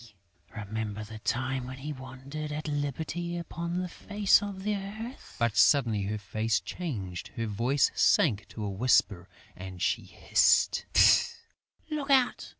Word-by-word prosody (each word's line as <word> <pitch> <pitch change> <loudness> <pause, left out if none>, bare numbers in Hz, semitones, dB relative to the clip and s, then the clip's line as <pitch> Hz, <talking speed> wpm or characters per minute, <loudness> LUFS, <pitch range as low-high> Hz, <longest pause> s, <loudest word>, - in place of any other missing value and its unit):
Remember 110 0 -4
the 110 +1 -9
time 130 +2 -2
when 130 +1 -8
we 150 +2 -5
wandered 135 +3 -7
at 150 +1 -4
liberty 155 +4 -3
upon 170 0 -4
the 180 0 -2
face 205 +3 +2
of 200 -2 -6
the 210 0 0
earth!..." 215 +6 -8
But, 115 -3 0
suddenly 105 +2 +4
her 105 +2 -2
face 105 +3 -1
changed, 100 - -5
her 115 - -2
voice 120 +7 +1
sank 105 - +3
to 110 - -7
a 105 - -2
whisper 100 -4 +2 0.3
and 95 0 -9
she - - 0
hissed, - - +2 1.1
"Look 295 -2 -3
out! 260 -3 +2
130 Hz, 145 wpm, -29 LUFS, 105-170 Hz, 1.1 s, suddenly